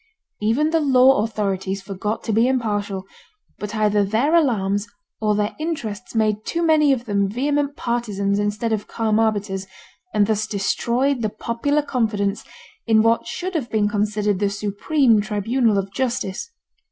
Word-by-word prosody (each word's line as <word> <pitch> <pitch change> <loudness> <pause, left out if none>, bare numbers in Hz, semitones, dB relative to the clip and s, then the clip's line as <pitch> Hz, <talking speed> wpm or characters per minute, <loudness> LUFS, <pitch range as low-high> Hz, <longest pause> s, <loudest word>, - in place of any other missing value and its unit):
Even 255 +9 +2
the 330 - +3
law 265 -5 +5
authorities 195 -3 -2
forgot 205 +2 -4
to 225 - -2
be 225 +3 +4
impartial, 205 -6 -1 0.5
but 210 +1 -5
either 210 -1 +2
their 225 +10 +1
alarms 210 - +2 0.3
or 210 -1 +1
their 210 +1 -1
interests 270 -11 -4
made 215 -1 +1
too 340 +7 -2
many 310 -3 +4
of 245 -3 0
them 200 -3 0
vehement 285 +5 0
partisans 205 -6 -1
instead 210 +2 -1
of 210 -1 -3
calm 220 -1 0
arbiters, 205 -3 -1 0.4
and 210 -8 +3
thus 215 0 0
destroyed 240 +6 0
the 215 - 0
popular 235 +7 -1
confidence 215 -7 -1 0.4
in 220 -1 +5
what 230 0 +2
should 370 +1 -4
have 285 -8 -2
been 215 -2 +1
considered 210 -1 0
the 200 -1 +1
supreme 210 +4 +2
tribunal 215 +2 +1
of 195 0 -3
justice. 240 - -2
215 Hz, 155 wpm, -22 LUFS, 205-250 Hz, 0.5 s, law